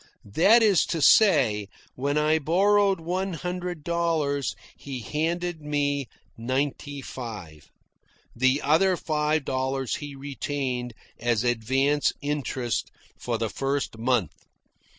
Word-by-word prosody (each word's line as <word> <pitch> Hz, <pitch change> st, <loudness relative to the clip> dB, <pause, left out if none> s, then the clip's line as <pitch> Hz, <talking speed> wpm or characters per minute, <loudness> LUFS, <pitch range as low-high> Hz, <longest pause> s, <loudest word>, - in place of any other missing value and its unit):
That 220 Hz, -, +6 dB
is 205 Hz, -5 st, +4 dB
to 165 Hz, -, -2 dB
say, 135 Hz, -, +5 dB, 0.3 s
when 140 Hz, +3 st, -1 dB
I 155 Hz, +1 st, +3 dB
borrowed 195 Hz, +4 st, +3 dB
one 185 Hz, +3 st, -2 dB
hundred 180 Hz, -1 st, -4 dB
dollars, 160 Hz, -5 st, 0 dB, 0.2 s
he 135 Hz, -3 st, -7 dB
handed 165 Hz, +5 st, -2 dB
me 145 Hz, -2 st, -1 dB, 0.3 s
ninety 135 Hz, +3 st, -3 dB
five. 105 Hz, -, -8 dB, 0.7 s
The 130 Hz, +4 st, +2 dB
other 175 Hz, +6 st, +3 dB
five 155 Hz, -2 st, 0 dB
dollars 130 Hz, -1 st, -1 dB
he 145 Hz, -1 st, -8 dB
retained 135 Hz, -3 st, -4 dB, 0.2 s
as 120 Hz, -1 st, +1 dB
advance 130 Hz, +5 st, +1 dB
interest 135 Hz, -5 st, -2 dB, 0.3 s
for -, -, -3 dB
the -, -, -2 dB
first 135 Hz, -4 st, -2 dB
month. 120 Hz, -4 st, +1 dB
145 Hz, 110 wpm, -26 LUFS, 130-165 Hz, 0.7 s, That